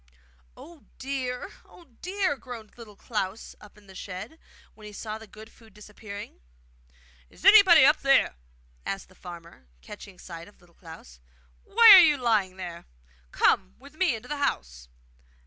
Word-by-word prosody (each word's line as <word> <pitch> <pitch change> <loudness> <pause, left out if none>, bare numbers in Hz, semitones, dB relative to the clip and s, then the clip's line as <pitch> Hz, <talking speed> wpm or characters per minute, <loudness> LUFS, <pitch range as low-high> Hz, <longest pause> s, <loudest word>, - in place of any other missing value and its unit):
'Oh, 330 -2 -15
dear! 260 +4 -5
oh, 345 - -19 0.2
dear!' 375 -4 -2
groaned 240 -5 -11
Little 225 -4 -14
Klaus 210 -1 -5
up 210 0 -17
in 210 - -20
the 195 - -16
shed, 190 - -9 0.3
when 215 -1 -14
he 210 - -12
saw 215 +1 -7
the 220 - -14
good 215 +2 -15
food 220 -3 -21
disappearing. 210 - -11 0.9
'Is - - -16
anybody 380 -9 +8
up 305 - +4
there?' 275 0 +3 0.5
asked 195 -1 -6
the - - -20
farmer, 170 - -13
catching 200 -2 -12
sight 170 -2 -11
of 205 - -21
Little 175 -1 -25
Klaus. 160 - -14 0.5
'Why 460 0 +7
are 385 - +11
you 300 -3 +3
lying 215 -7 0
there? 175 -2 -9 0.4
Come 190 -1 +1
with 280 +3 -17
me 335 -7 0
into 225 +3 -11
the 295 - -5
house. 60 - -4
215 Hz, 160 wpm, -26 LUFS, 190-275 Hz, 0.9 s, are